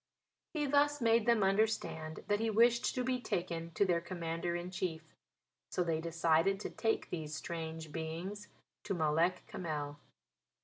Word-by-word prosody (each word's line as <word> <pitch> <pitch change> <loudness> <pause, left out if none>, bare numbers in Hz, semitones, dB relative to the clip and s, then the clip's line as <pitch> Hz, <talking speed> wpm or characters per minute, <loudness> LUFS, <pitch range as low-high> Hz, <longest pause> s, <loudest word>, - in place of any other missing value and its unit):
He 300 -1 +1
thus 290 +1 +3
made 230 -1 +3
them 230 -3 +5
understand 195 -6 0
that 205 0 +2
he 225 0 +1
wished 235 +2 +4
to 255 - 0
be 255 0 0
taken 170 -5 -2
to 200 - +4
their 175 -3 +2
Commander 170 -1 -3
in 175 +1 -4
Chief. 170 -3 -2 0.7
So 180 - 0
they 165 -2 0
decided 165 +3 +2
to - - -4
take 225 -1 -1
these 155 -3 -4
strange 160 -1 -5
beings 165 +7 -5 0.4
to 200 -2 -1
Malek 165 +3 +2
Kamel. 150 -4 -4
175 Hz, 150 wpm, -34 LUFS, 160-220 Hz, 0.7 s, them